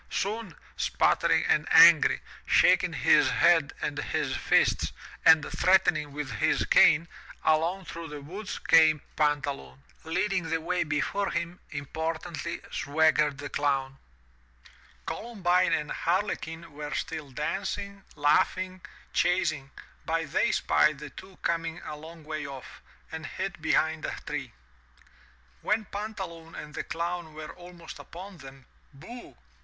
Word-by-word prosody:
Soon, 205 -3 -3 0.2
sputtering - - +2
and - - +2
angry, - - +7 0.3
shaking - - +4
his - - +4
head - - +4
and - - -2
his - - -2
fists, - - +2 0.3
and 160 -2 +7
threatening 180 -5 +3
with 145 -2 -5
his - - +2
cane, 160 +2 +5 0.4
along 165 +5 +1
through 165 0 -7
the 150 -1 -8
woods 185 +8 -6
came 160 -2 +4
Pantaloon. 140 - -1 0.2
Leading 185 +1 -1
the 165 - 0
way 175 +2 -1
before 160 +6 -1
him, 170 +1 -3
importantly 160 +3 -4
swaggered 150 -1 +2
the 145 +1 -6
Clown. 135 -2 -1 1.1
Columbine 185 -6 0
and 150 -1 -1
Harlequin 170 -3 -2
were 150 0 -6
still 150 -3 -4
dancing, 195 +7 -4
laughing, 185 +5 +1 0.3
chas 180 +1 +2
ing, 135 -1 -9 0.4
but 165 -2 -1
they - - +2
spied 150 -1 +2
the 145 -1 -9
two 190 +5 -13
coming 165 0 -1
a 150 - -6
long 160 +2 -12
way 155 -1 -5
off, 135 -2 -10 0.3
and 160 0 -6
hid 190 -3 -5
behind 160 0 +1
a - - -3
tree. - - -4 1.1
When 215 0 0
Pantaloon 190 -6 -7
and 150 0 -8
the - - -4
Clown 170 -1 -4
were 155 0 -8
almost 175 -2 -12
upon 185 +1 -10
them, 135 -1 -13 0.3
booh! 235 - -12
160 Hz, 130 wpm, -28 LUFS, 150-180 Hz, 1.1 s, angry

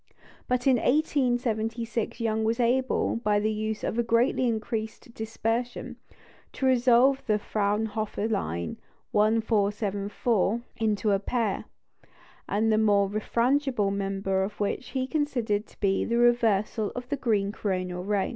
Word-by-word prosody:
But 250 0 0
in 265 -2 +5
1876 240 -5 0
Young 220 -1 0
was 225 +2 0
able, 250 0 +1
by 210 -3 +1
the 215 +1 0
use 215 0 -3
of 235 0 -1
greatly 240 +2 +2
increased 220 0 -3
dispersion, 225 +2 -3 0.6
to 270 - -2
resolve 260 +1 +4
the 215 -1 +3
Fraunhofer 210 +1 -1
line 85 - -2 0.3
"1474" 210 0 +1 0.2
into 215 -1 +1
a 195 - +3
pair, 220 -1 -1 0.8
the 215 +2 +2
more 200 -2 +3
refrangible 235 0 +1
member 195 -1 -1
of 200 +2 -4
which 210 +5 -2
he 260 -1 -1
considered 245 -8 -1
to - - -22
be 195 -1 +1
the 235 - 0
reversal 225 -3 +2
of 245 0 -6
the 285 - 0
green 210 -7 0
coronal 185 -4 -3
ray. 200 0 0
220 Hz, 125 wpm, -27 LUFS, 205-240 Hz, 0.8 s, in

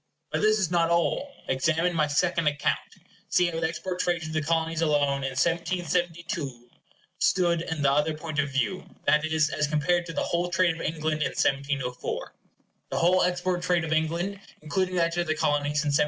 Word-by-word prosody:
But - - 0
this 215 +1 +4
is 185 -5 0
not 170 -1 +3
all. 170 +11 +1 0.2
Examine 165 +6 +1
my 155 -2 +2
second 170 +2 +1
account. 145 -1 +1 0.5
See 180 - +3
how 165 -1 -2
the 160 - +1
export 180 +2 -4
trade 175 -2 0
to 155 - -5
the 155 0 0
Colonies 165 +1 0
alone 145 -3 +2
in 135 - -1
1772 170 -5 -1 0.5
stood 170 -3 +2
in 160 -3 -3
the 140 - +4
other 150 +2 +1
point 155 -1 -4
of 140 -1 +1
view; 130 -6 -1 0.2
that 150 0 +4
is, 155 -1 +2
as 150 - 0
compared 170 +4 +1
to 165 - -6
the - - -1
whole 175 +1 -1
trade 175 -1 +2
of 165 - -8
England 155 -1 -1
in - - +1
1704:— 135 -2 -1 0.6
The - - -2
whole 180 +2 +4
export 180 0 0
trade 180 -2 +1
of 160 0 -1
England, 170 +5 -1 0.2
including 185 +4 -1
that 170 -1 +2
to 175 0 +1
the 155 -2 -1
Colonies, 145 0 +1
in 150 - 0
1704. 145 - +3
165 Hz, 195 wpm, -27 LUFS, 150-175 Hz, 0.6 s, this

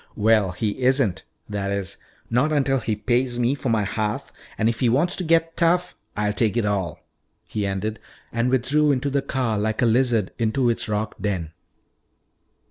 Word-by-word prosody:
"Well, 110 -2 +3
he 105 +5 -2
isn't. 125 -7 +2 0.2
That 100 -1 -3
is, 100 -1 -3 0.3
not 125 +7 +2
until 135 -3 +2
he 110 -2 -1
pays 120 +3 0
me 120 +2 +2
for 140 -2 -3
my 110 -2 +2
half. 105 +1 -3 0.2
And 110 - +2
if 115 -1 0
he 125 - +3
wants 160 +10 +2
to 185 - -2
get 165 0 +2
tough, 180 +1 +2 0.2
I'll 105 0 +1
take 110 +1 +1
it 115 - +1
all," 95 -7 -2 0.4
he 105 -2 -2
ended, 100 +2 -3 0.3
and 115 +1 0
withdrew 140 +4 +2
into 140 +1 0
the 140 0 +1
car 125 -6 -1
like 110 +3 0
a - - +5
lizard 115 -3 +2
into 120 +2 +2
its 115 - -2
rock 105 +1 -2
den. 90 -6 -2
115 Hz, 180 wpm, -23 LUFS, 105-135 Hz, 0.4 s, a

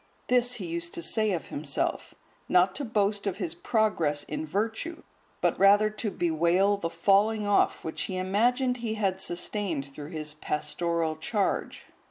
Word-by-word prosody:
This 245 0 +3
he 195 - -5
used 170 0 -4
to - - -4
say 215 +6 +1
of 170 -6 -3
himself, 140 -1 -3 0.3
not 180 +1 +4
to 285 - -3
boast 205 -3 0
of 190 -1 -1
his 180 -6 -3
progress 170 -10 +1
in 155 +1 -5
virtue, 225 - -2 0.4
but - - +1
rather 205 +2 +6
to 215 +1 -3
bewail 175 +3 +2
the 165 -4 -3
falling 210 +4 +2
off 205 0 +2
which 160 - -4
he 185 - -3
imagined 245 +7 +1
he 230 -2 -3
had 190 -3 -1
sustained 175 -4 -2
through 145 +1 -8
his 155 -2 -5
pastoral 155 +2 -2
charge. 200 +5 -1
190 Hz, 160 wpm, -28 LUFS, 165-215 Hz, 0.4 s, rather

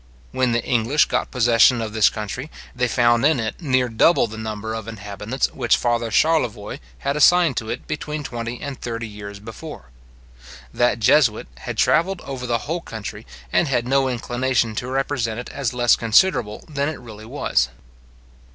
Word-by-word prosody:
When 130 - +1
the 115 0 0
English 120 +5 +2
got - - -1
possession 120 -1 +4
of 110 -2 -4
this 110 -2 +5
country, 110 +7 -5 0.3
they 125 0 +1
found 120 0 +3
in 150 -2 +4
it 110 +7 -4
near 130 -5 +2
double 120 +9 +4
the 110 -1 -8
number 110 0 -5
of 110 -1 -5
inhabitants 105 +3 -3
which - - +2
father 120 -1 0
Charlevoix 120 -5 +1 0.2
had 140 - -2
assigned 165 0 +5
to 110 - -3
it - - -4
between 150 0 -4
twenty 120 -2 -5
and 140 -3 -7
thirty 115 -1 -4
years 105 -1 -9
before. 115 - -10 0.8
That 120 0 +2
jesuit 120 - +3
had - - -6
travelled 185 +2 +2
over 130 -2 -6
the 120 0 +1
whole 165 +3 -2
country, 110 -9 -8 0.3
and 170 - +3
had 125 -3 0
no 135 0 +2
inclination 120 -1 0
to 125 - -3
represent 130 -4 -1
it 125 - -7
as 135 -4 -2
less 120 -1 +3
inconsiderable 115 - +2
than 145 -1 -1
it 155 - -6
really 110 -3 -11
was. 115 - 0
120 Hz, 170 wpm, -22 LUFS, 110-135 Hz, 0.8 s, this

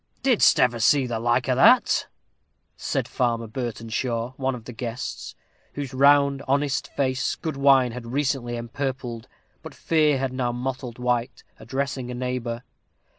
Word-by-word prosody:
"Didst 255 -5 +4
ever 120 -2 +3
see 135 +4 +4
the 120 -2 -3
like 120 +1 +1
o' - - +3
that?" - - +4 0.7
said - - -2
Farmer 115 -2 -1
Burtenshaw 115 +1 -3
one 135 -1 -1
of 115 -3 -11
the 125 - -8
guests, 120 +1 -6 0.4
whose 140 -3 -5
round, 140 0 +4
honest 140 0 0
face 130 -2 -1
good 160 -3 -4
wine 135 -3 +4
had 115 0 -8
recently 130 -2 -1
empurpled, 125 -1 -5 0.3
but - - -10
fear 155 -3 +2
had 130 -1 -2
now 125 -2 -1
mottled 125 0 -5
white, 125 0 -1 0.2
addressing 130 +2 -3
a 125 - -5
neighbor. 125 -1 -3
125 Hz, 145 wpm, -24 LUFS, 120-135 Hz, 0.7 s, Didst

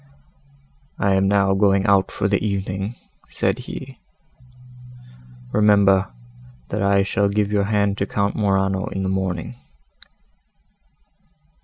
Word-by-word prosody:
"I 100 -1 +1
am 95 0 +2
now 100 -1 +2
going 100 0 +2
out 100 -1 +3
for 100 - -2
the 100 0 0
evening," 100 +1 -3 0.3
said - - -1
he, 130 +1 -9 1.5
"remember, 100 -2 +3 0.6
that 105 - -3
I 100 0 +3
shall 100 0 0
give 105 0 0
your 100 -1 +1
hand 100 -1 0
to 100 - -1
Count 100 0 -1
Morano 95 -2 0
in 95 - -4
the 95 - -1
morning." 95 0 -3
100 Hz, 120 wpm, -21 LUFS, 95-100 Hz, 1.5 s, out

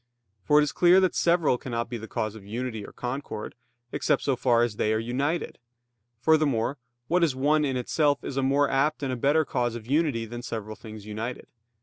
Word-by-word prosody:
For 150 - +4
it - - +5
is 150 - -1
clear 180 +1 +5
that 185 -1 +2
several 170 -7 +2
cannot 120 -2 -3
be 120 0 -5
the 110 - -8
cause 110 -1 -2
of 110 -3 -11
unity 110 +1 -4
or - - -10
concord, 125 -4 -5 0.4
except - - +1
so 135 - +1
far 120 -1 +3
as 115 -3 -2
they 105 - +1
are - - +2
united. 135 +8 -2 0.6
Furthermore, 140 -3 +2 0.3
what 175 +1 +2
is 150 -6 +2
one 150 +3 +2
in 135 -3 0
itself 145 +3 +1
is 135 - -5
a 135 - +1
more 140 +2 +3
apt 145 +3 +1
and 130 -2 -1
a - - -1
better 145 +6 +2
cause 120 -3 -1
of 115 -2 -7
unity 140 -4 +1
than 120 +2 -7
several 110 -3 -5
things 110 -2 -10
united. 110 +4 -5
130 Hz, 210 wpm, -26 LUFS, 115-145 Hz, 0.6 s, it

